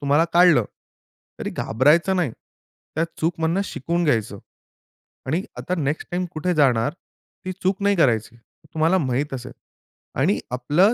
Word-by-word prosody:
तुम्हाला 145 +3 +3
काढलं, 170 -8 +6 0.8
तरी - - -3
घाबरायचं 155 - +2
नाही. 175 -8 +1 0.6
त्या 160 - +1 0.2
चूकमधनं 165 +2 0
शिकून 170 +1 -2
घ्यायचं. 110 -8 0 0.9
आणि 160 +8 0 0.2
आता 180 - -2
नेक्स्ट 150 0 -2
टाईम 180 +1 -1
कुठे 175 +3 -1
जाणार 135 -4 +3 0.5
ती 185 - -3
चूक 190 +2 0
नाही 200 -1 +3
करायची. 115 -6 +1 0.4
तुम्हाला 165 +4 +3
माहीत 135 -1 -1
असेल. 125 0 -7 0.7
आणि 185 +10 +2
आपलं 150 - +3
155 Hz, 130 wpm, -23 LUFS, 130-180 Hz, 0.9 s, काढलं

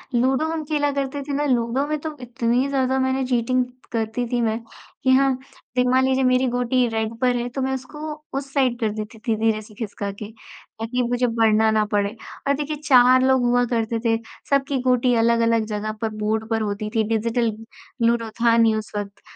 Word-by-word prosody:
Ludo 260 +5 +2
हम 325 -1 -3
खेला 290 -1 0
करते 280 0 -3
थे 285 - -3
ना, 290 +1 0
लूडो 250 +1 +1
में 305 0 -1
तो 310 0 -6
इतनी 245 +2 0
ज़्यादा 265 -1 +1
मैंने 260 0 0
चीटिंग 250 0 +1 0.3
करती 225 +1 -1
थी 245 - +1
मैं 225 -1 0 0.4
कि 260 - +2
हाँ, 270 +1 +4 0.4
देखिए 250 0 +2
मान 260 +1 +4
लीजिए 265 0 +2
मेरी 255 0 +3
गोटी 245 0 +1
रेड 220 0 -2
पर 250 -1 +2
है 240 0 -1
तो 265 +2 -4
मैं 265 0 0
उसको 300 +4 -6 0.2
उस 275 0 -6
साइड 255 -4 +1
कर 220 -3 +1
देती 215 +1 -7
थी 225 - +2
धीरे 220 -1 +1
से 215 0 -15
खिसका 205 -2 -4
के, 205 +2 -9 0.5
ताकि 245 +3 -1
मुझे 245 0 +1
बढ़ना 220 -1 +3
न 215 -1 +2
पड़े। 205 +1 0 0.3
और 280 - +4
देखिए 300 +1 -3
4 255 -1 +6
लोग 260 -1 +4
हुआ 245 0 +3
करते 230 0 0
थे, 225 0 +3 0.3
सबकी 275 0 +1
गोटी 250 -1 +2
अलग-अलग 230 -1 +3
जगह 215 0 -3
पर 225 - 0
बोर्ड 215 +1 -2
पर 225 -1 0
होती 210 0 -3
थी 220 - +3
डिजिटल 230 +1 +1 0.6
लूडो 230 -1 +1
था 230 -1 +5
नहीं 225 -1 +4
उस 215 -1 -5
वक़्त, 200 -1 -6
240 Hz, 200 wpm, -22 LUFS, 225-260 Hz, 0.6 s, 4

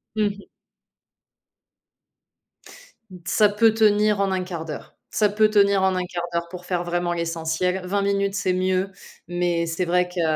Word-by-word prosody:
Mmh 215 - +2
mh. 200 0 -3 2.8
Ça 210 +3 +4
peut 220 +2 +3
tenir 210 -1 +3
en 195 -1 +1
1/4 180 -3 -3
d'heure, 155 -2 -8
ça 210 - +2
peut 215 +1 +3
tenir 200 -2 +3
en 190 -1 +2
1/4 180 -1 -3
d'heure 170 0 -2
pour 180 +1 -9
faire 175 -1 -2
vraiment 175 0 -1
l'essentiel. 170 +2 -2
20 200 +2 0
minutes, 200 0 0
c'est 185 -2 0
mieux 185 +1 0 0.4
mais 175 -1 0
c'est 165 +2 -2
vrai 180 +1 +2
que 180 0 -4
185 Hz, 150 wpm, -23 LUFS, 175-200 Hz, 2.8 s, Ça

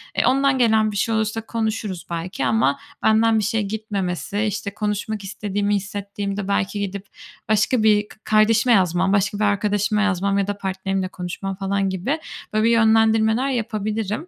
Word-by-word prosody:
E, - - +2
ondan 275 +1 +3
gelen 220 -3 +3
bir 205 - -4
şey 225 +2 0
olursa 220 +1 -1
konuşuruz 220 -5 -3
belki 170 -3 -3
ama 125 +3 +2 0.2
benden 220 0 +4
bir - - -1
şey 225 +2 0
gitmemesi, 200 -1 -3
işte, 210 -1 -3
konuşmak 210 0 -3
istediğimi 205 0 -2
hissettiğimde 200 0 -4
belki 200 0 -1
gidip 200 0 -4 0.4
başka 215 +2 +2
bir 210 -1 +4
k - - -15
kardeşime 220 +3 +4
yazmam, 185 -1 +2
başka 205 +1 +1
bir - - +1
arkadaşıma 205 +1 +1
yazmam 200 -1 +1
ya 200 -1 0
da 205 0 -3
partnerimle 190 -1 -2
konuşmam 190 +2 -5
falan 195 0 -1
gibi 190 - -2 0.3
böyle, 215 +1 +2
bir, 230 - +4
yönlendirmeler 225 +2 +3
yapabilirim. 215 - -2
205 Hz, 160 wpm, -22 LUFS, 195-220 Hz, 0.4 s, benden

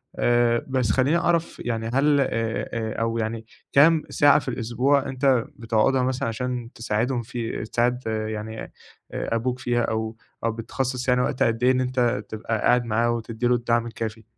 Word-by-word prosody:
آآ، 120 -1 +2
بس 130 -5 +1
خليني 135 +8 +2
أعرف 170 -1 0
يعني 115 -2 -2
هل 145 +2 +3
آآ - - +2 0.5
آآ، 110 -1 -3
أو 115 0 0
يعني 110 0 -3 0.3
كام 155 +3 +6
ساعة 145 -1 +5
في - - -11
الأسبوع 125 +4 +1
إن - - -6
أنت 130 -3 +2
بتقعدها 115 +3 +1
مثلًا 130 -1 -1
عشان 125 +1 -4
تساعدهم 120 +3 -1
في 115 -1 -4
تساعد 125 +2 0
يعني 110 0 -3
آآ، - - -9 0.6
أبوك 125 +2 -1
فيها 120 -2 0
أو 110 0 -2 0.3
أو 115 - +1
بتخصَّص 125 +3 -3
يعني 125 0 +3
وقت 130 - 0
قد 115 +1 0
إيه 130 - +6
إن 130 0 +1
أنت 125 -4 0
تبقى 110 +1 -3
قاعد 125 0 +3
معاه، 115 +1 +1
وتدّي 115 0 -2
له 125 - +4
الدعم 120 0 0
الكافي؟ 115 -1 -5
120 Hz, 175 wpm, -24 LUFS, 115-130 Hz, 0.6 s, كام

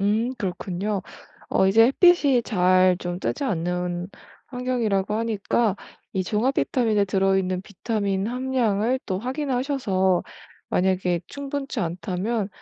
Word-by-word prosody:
음 220 +6 +1
그렇군요. 195 0 -3 0.5
어 190 - +3
이제 225 +4 +6
햇빛이 285 -4 +4
잘 185 -2 +3
좀 175 0 -4
뜨지 285 - -2
않는 180 -2 -2 0.4
환경이라고 235 -6 -1
하니까 220 -1 0 0.4
이 185 -1 -1
종합 230 +8 0
비타민에 220 -5 +1
들어있는 190 -1 +1
비타민 200 -1 -2
함량을 245 -1 0
또 185 -1 -1
확인하셔서 250 - 0 0.5
만약에 180 -2 +1
충분치 280 -2 -5
않다면 185 +5 -2
205 Hz, 270 characters per minute, -24 LUFS, 185-245 Hz, 0.5 s, 이제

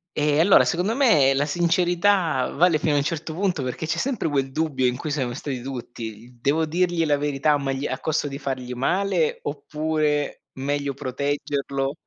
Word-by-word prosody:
Ehm, 150 0 +2
allora 190 +3 +6
secondo 180 +6 0
me 160 - +4
la 140 +2 +1
sincerità 175 -1 +2
vale 170 0 +4
fino 155 - +1
a - - +3
un 140 - +2
certo 160 0 -3
punto 180 -4 -1
perché 130 +5 -4
c'è 160 - -1
sempre 250 -10 -1
quel 135 -3 0
dubbio 145 -4 0
in 125 0 +1
cui 155 - -5
siamo 130 -5 -1
stati 135 -1 -5
tutti. 120 -2 -8
"Devo 155 +5 +2
dirgli 175 +1 +1
la 150 -2 +3
verità 145 +1 +1
o - - +3
magli 135 0 -2
a 130 - -3
costo 155 +1 -1
di 140 -1 -5
fargli 130 -3 -4
male 180 +5 0
oppure 150 0 -1
meglio 140 +1 -2
proteggerlo?" 140 0 -2
145 Hz, 180 wpm, -24 LUFS, 135-165 Hz, -, allora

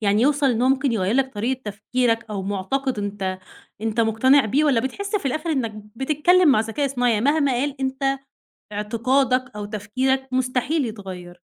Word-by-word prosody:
يعني 210 +1 +2
يوصل 290 +1 +3
إن 235 0 0
هو 255 - +4
ممكن 265 -1 +2
يغيّر 200 -1 0
لك 265 0 +1
طريقة 245 +5 -1
تفكيرك 230 +3 -1
أو 200 -2 -3
مُعتقد 205 +6 -2
أنت 195 -2 -3 0.4
أنت 225 +1 -1
مقتنع 240 +5 +4
بيه 275 +8 +2
والّا 275 -6 +3
بتحس 400 - -3
في 380 - -3
الآخِر 310 +5 -2
إنّك 245 -7 -1 0.2
بتتكلِّم 305 +6 +3
مع 260 -6 +5
ذكاء 225 +6 -1
اصطناعي، 245 -3 +1
يعني 215 +3 0
مهما 285 -1 +3
قال 275 +3 -2
أنت 265 +1 -3 0.7
اعتقادك 250 +5 0
أو 210 0 -5
تفكيرك 255 +6 -1
مستحيل 255 +4 0
يتغيّر. 185 -5 -8
250 Hz, 170 wpm, -22 LUFS, 215-275 Hz, 0.7 s, مع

